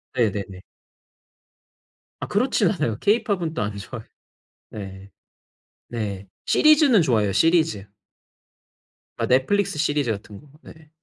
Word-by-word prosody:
네네네. 100 -5 -1 1.6
아 - - -5
그렇진 - - +1
않아요. 110 -2 -2
케이팝은 200 -6 0
또 - - -3
안 105 0 -3
좋아해. 110 +3 -8 0.6
네. 95 -2 -9 0.8
네. 100 -4 -5 0.2
시리즈는 300 - +5
좋아해요. 110 -9 +1
시리즈. 160 - +2 1.3
아 - - +1
넷플릭스 180 +7 +1
시리즈 145 -5 0
같은 100 -1 -7
거. 150 - -19
네. 160 -1 -16
120 Hz, 240 characters per minute, -23 LUFS, 100-165 Hz, 1.6 s, 시리즈는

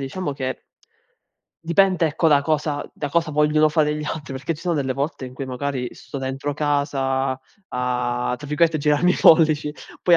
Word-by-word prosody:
diciamo 145 +4 -3
che 130 -1 -5 1.0
dipende, 175 +1 +3
ecco, 155 +2 0
da 140 -2 +4
cosa 150 -1 -1
da 145 - -4
cosa 165 0 +1
vogliono 150 +1 +3
fare 150 -1 +1
gli 150 - -4
altri, 150 -2 -5
perché 140 +5 -3
ci 150 - -12
sono 175 -2 0
delle 135 -3 0
volte 140 0 -3
in 125 - -10
cui 135 - -5
magari 130 -1 -3
sto 140 - -8
dentro 135 +2 -3
casa 140 -2 0 0.4
a 125 0 -1
tra 145 - -10
virgolette, 160 +2 +2
"girarmi 150 +5 +3
i - - -2
pollici," 155 -2 +5 0.3
poi 175 -1 +6
145 Hz, 175 wpm, -22 LUFS, 135-155 Hz, 1.0 s, poi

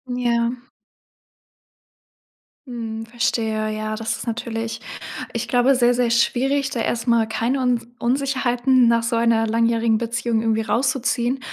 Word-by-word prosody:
Ja. 240 0 0 2.0
Mhm. 225 -2 -5
Verstehe. 225 -2 -1
Ja, 215 0 -3
das 225 0 -3
ist - - -8
natürlich 225 0 -4 0.5
ich - - -3
glaube, 250 +2 +3
sehr, 245 -1 +4
sehr 245 -1 +1
schwierig, 270 +4 +1
da 245 -5 -3
erst 230 +2 -2
mal 230 -2 +3
keine 235 +4 -1
Uns 245 -2 0
Unsicherheiten 255 -1 +2
nach 230 0 +2
so 230 0 -1
einer 230 -1 +2
langjährigen 230 0 +2
Beziehung 235 0 -1
irgendwie 225 -1 +1
rauszuziehen. 250 +2 0
235 Hz, 130 wpm, -21 LUFS, 225-245 Hz, 2.0 s, sehr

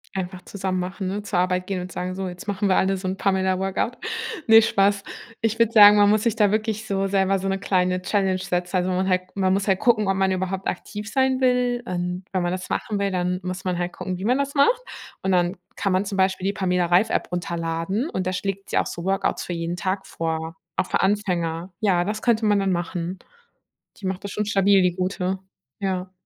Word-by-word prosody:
Einfach 185 -1 -4
zusammen 190 -1 -3
machen, 185 +2 -4
ne, 200 +2 -3
zur 195 -3 -1
Arbeit 180 0 +1
gehen 185 -1 -3
und 180 0 -7
sagen: 180 +1 -4
„So, 190 0 -4
jetzt 180 +4 -8
machen 200 0 0
wir 185 - +4
alle 195 0 +2
so 185 0 -5
'n 190 +1 -2
Pamela 190 -1 +1
Workout.“ 195 +5 -2 0.5
Ne, 225 -1 +8
Spaß. 200 -2 +2 0.4
Ich 225 0 0
würde 230 -1 +3
sagen, 210 -2 +9
man 205 0 +6
muss 215 0 +3
sich 230 -2 +1
da 210 -3 +3
wirklich 215 0 -1
so 195 -2 0
selber 195 0 +2
so 195 - -3
'ne 195 0 0
kleine 185 -2 +1
Challenge 190 -1 +1
setzen, 180 -1 -2
also, 180 0 +1
man 185 +1 0
halt 185 0 +2
man 190 -1 +2
muss 195 +1 0
halt 190 -1 +2
gucken, 220 -4 +3
ob 195 - +3
man 190 0 +2
überhaupt 190 +1 -2
aktiv 210 +3 -5
sein 265 +1 +2
will 250 -1 +2
und 180 +1 -3
wenn 185 -2 0
man 175 - 0
das 185 0 -4
machen 215 -4 -2
will, 200 0 +1
dann 180 -1 -1
muss 185 0 -5
man 180 -1 -1
halt 175 0 -2
gucken, 185 -1 -5
wie 190 - -4
man 250 +3 +3
das 280 0 -1
macht. 300 - +3 0.4
Und 190 - +1
dann 180 +1 +2 0.2
kann 195 +1 -1
man 185 +2 +1
zum 195 0 -4
Beispiel 190 -1 +1
die 200 - +1
Pamela 180 -3 +1
Reif-App 180 +6 +2
runterladen 170 - -2
und 185 -1 -2
da 185 - -1
schlägt 195 +1 -3
sie - - 0
auch - - +2
so 170 - -6
Workouts 195 0 0
für 175 - -4
jeden 170 0 -3
Tag 190 +2 -2
vor, 160 0 -3 0.2
auch - - +1
für - - 0
Anfänger. 180 -3 -1
Ja, 185 -5 +2
das 210 +3 -3
könnte 230 -2 +2
man 205 -1 +3
dann 195 -1 +1
machen. 175 +1 -3 0.8
Die 200 - -8
macht 190 0 -3
das 200 - -4
schon 210 - -2
stabil, 200 -2 +4
die 180 -1 +1
gute. 185 0 -2 0.4
Ja. 185 -1 -2
190 Hz, 230 wpm, -23 LUFS, 180-205 Hz, 0.8 s, sagen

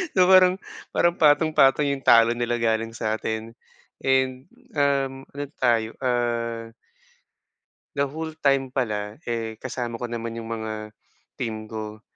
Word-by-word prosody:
So 185 -1 +5
parang, 185 0 +6 0.3
parang 175 0 +2
patong-patong 150 -2 +4
yung 140 -1 -2
talo 115 0 +6
nila 120 0 -1
galing 115 0 0
sa'tin 110 0 -3 0.5
and, 130 -1 +1 0.3
um, 135 -2 +1
ano 145 +1 -5
tayo, 115 -3 +1
ah 120 -2 -1 1.3
the 140 0 +1
whole 160 +2 -5
time 135 -2 +2
pala, 105 -1 -2
eh 115 -1 -2
kasama 120 -2 -4
ko 120 - -3
naman 115 -1 -4
yung 115 0 -6
mga 110 -1 -5 0.5
team 110 -2 -4
ko. 110 -1 -6
120 Hz, 130 wpm, -24 LUFS, 115-135 Hz, 1.3 s, parang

